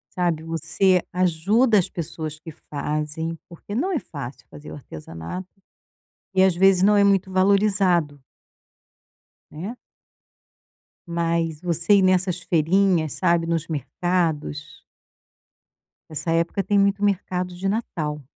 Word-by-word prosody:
Sabe, 170 -3 0
você 165 +3 +1
ajuda 195 +7 +3
as 180 - +1
pessoas 155 -2 -6
que 160 +1 -10
fazem, 150 +2 -4
porque 175 +4 -9
não 290 - 0
é 330 - +1
fácil 140 - -9
fazer 150 +1 -11
o - - -8
artesanato, 80 - -8 0.9
e, 190 - +5
às 190 -1 +4
vezes, 190 +1 +4
não 205 +1 +5
é 200 - +5
muito 195 -1 +2
valorizado 190 -5 +2 1.3
né. 185 +10 -6 1.3
Mas 170 -2 -1
você 170 +2 +2
ir 200 - +5
nessas 185 -1 +2
feirinhas, 170 -1 +2
sabe, 170 -2 +1
nos 165 -1 -1
mercados 155 +1 -2 1.3
Essa 160 +1 -3
época 170 +4 0
tem 205 +1 +1
muito 200 0 +2
mercado 180 -2 -1
de 195 +2 -2
Natal. 155 -9 -3
175 Hz, 120 wpm, -23 LUFS, 160-195 Hz, 1.3 s, e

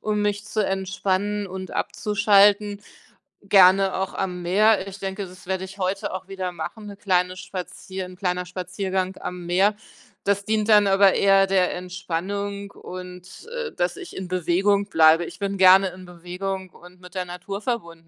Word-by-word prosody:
um 210 -1 -1
mich 205 0 -1
zu 215 -1 -1
entspannen 195 +2 -1
und 185 -1 -7
abzuschalten, 205 0 +2 0.6
gerne 195 -1 +5
auch 190 0 -2
am 180 -2 -3
Meer. 200 +2 +3
Ich 195 0 -9
denke, 195 +1 -4
das 180 0 -14
werde 190 0 -2
ich 190 +1 -10
heute 190 +1 -2
auch 185 0 -6
wieder 190 -2 -4
machen, 175 +6 -7
'ne 205 -1 -8
kleine 180 -2 +1
spazieren 185 0 -7
'n - - -12
kleiner 180 -1 -2
Spaziergang 185 +1 -3
am 180 -1 -6
Meer. 195 +4 +3 0.5
Das 200 0 0
dient 215 0 0
dann 210 -1 +6
aber 195 0 +5
eher 195 0 +4
der 190 -2 +2
Entspannung 195 +3 -4
und, 180 - -10
äh, 475 -1 -4
dass 175 0 -2
ich - - -9
in 190 - -5
Bewegung 185 +3 +1
bleibe. 160 -2 +5
Ich - - -10
bin 200 -1 -2
gerne 190 +1 +7
in 185 +1 -12
Bewegung 180 +2 -6
und 180 +1 -17
mit 180 0 -14
der 185 -1 -2
Natur 180 +3 -6
verbunden. 170 -9 -4
190 Hz, 170 wpm, -23 LUFS, 180-200 Hz, 0.6 s, gerne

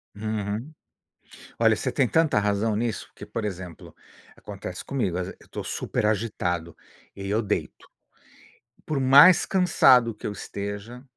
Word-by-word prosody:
Uhum. 110 +5 -4 0.9
Olha, - - +4
você - - -2
tem 130 - +1
tanta 160 -6 +2
razão 105 +1 0
nisso, 115 -1 -3
que, 105 - -10
por 105 +1 -4
exemplo, 90 -5 -7 0.4
acontece 95 -3 -8
comigo, 100 -10 -2
às 90 - -3
ve - - -8
eu - - -18
estou - - -7
super 105 - -2
agitado 90 -6 -2 0.4
e 100 0 -6
eu 110 +3 +1
deito, 105 -1 -4 1.0
por 150 -3 -2
mais 140 +7 +7
cansado 130 - +4
que 105 - -8
eu - - -3
esteja, 100 +5 -7
105 Hz, 145 wpm, -25 LUFS, 100-125 Hz, 1.0 s, mais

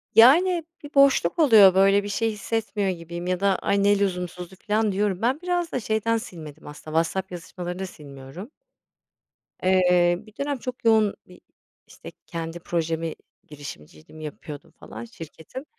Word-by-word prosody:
Yani, 335 +9 +6 0.2
bir 290 - -10
boşluk 275 - +4
oluyor, 220 - +7
böyle, 195 +1 +4
bir - - -5
şey 225 +2 0
hissetmiyor 210 -1 -2
gibiyim 170 0 -6
ya 180 -1 0
da 200 0 +2
"Ay, 200 0 +1
ne 205 0 +4
lüzumsuzdu." 180 -1 -3
filan, 215 +1 0
diyorum. 195 -1 -1
Ben 255 +5 +1
biraz 355 -1 -1
da - - -1
şeyden 220 0 0
silmedim 160 -9 -10
aslında, 150 +1 -9
WhatsApp 185 +3 -1
yazışmalarını 180 +1 -7
da 190 - -3
silmiyorum. 145 - -11 1.1
Eee, 180 -2 +4
bir 215 - -17
dönem 280 0 -1
çok 250 -1 -7
yoğun 220 -2 +4
bir, 180 - -16 0.5
işte, - - -12
kendi 165 0 -6
projemi, 165 -1 -2 0.3
girişimciydim, 140 - -11
yapıyordum, 150 0 -9
falan, - - -10
şirketim. 225 - -10
190 Hz, 150 wpm, -24 LUFS, 170-225 Hz, 1.1 s, oluyor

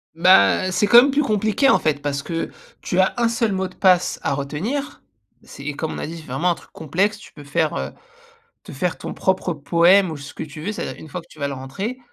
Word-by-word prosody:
Ben, 185 +2 +5
c'est 205 +3 +2
quand 235 +3 +9
même 275 +2 +2
plus 295 +2 +2
compliqué, 215 +2 +1
en - - +6
fait. 145 -2 0
Parce 140 -1 -2
que 165 -1 -3 0.3
tu 180 - -1
as 190 - +3
un 235 -1 +2
seul 230 -1 0
mot 190 -1 -1
de 185 - -17
passe 185 -2 +3
à - - 0
retenir. 160 - -4 0.4
C'est 140 - -12
et 145 -1 -3
comme 160 +1 -3
on - - -6
a - - -4
dit, 165 +2 -7
c'est 160 - -11
vraiment 140 +8 0
un - - 0
truc - - -18
complexe. 190 +8 -1
Tu - - -15
peux 145 - -12
faire 155 +2 0
heu, - - -3 0.7
te - - -12
faire 160 +5 -2
ton - - -6
propre 190 -2 0
poème 170 +6 +4
ou 160 - -5
ce 140 0 -10
que - - -6
tu 155 0 -9
veux, 200 +7 -3
c'est-à-dire 215 - -6
une 160 - -11
fois 175 +4 -6
que - - -24
tu - - -16
vas 140 -1 -2
le 140 - -4
rentrer 165 - -5
175 Hz, 255 wpm, -21 LUFS, 150-200 Hz, 0.7 s, quand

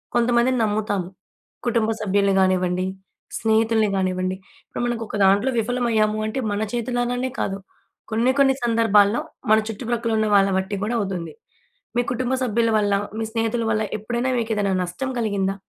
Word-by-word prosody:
కొంతమందిని 240 +1 +3
నమ్ముతాము. 205 -4 -1 0.6
కుటుంబ 230 -2 +1
సభ్యుల్ని 200 -1 +2
గానివ్వండి, 185 -1 +1 0.5
స్నేహితుల్ని 220 -1 +2
గానివ్వండి, 185 0 -1 0.3
ఇప్పుడు - - -4
మనకొక 230 -3 -3
దాంట్లో 200 +7 +3
విఫలమయ్యాము 225 -2 +1
అంటే 220 +5 -3
మన 205 - -1
చేతులారానే 245 +1 -1
కాదు. 195 - -1 0.5
కొన్ని, 235 +4 +2
కొన్ని 270 -1 +5
సందర్భాల్లో 225 -2 +3 0.3
మన 220 - +7
చుట్టుప్రక్కల 230 +1 -2
ఉన్న 215 0 +1
వాళ్ళ 195 0 +5
బట్టి 190 +2 -2
గూడా 225 +3 -1
అవుతుంది. 190 -4 -4 0.6
మీ - - +4
కుటుంబ 255 +1 -1
సభ్యుల 230 -1 +1
వళ్ళ, 205 -1 +1 0.3
మీ 225 - -1
స్నేహితుల 230 0 0
వళ్ళ 215 0 +1 0.2
ఎప్పుడైనా 240 +4 -2
మీకేదైనా 210 -4 0
నష్టం 180 +10 -4
కలిగిందా? 195 -3 0
220 Hz, 140 wpm, -22 LUFS, 200-240 Hz, 0.6 s, మన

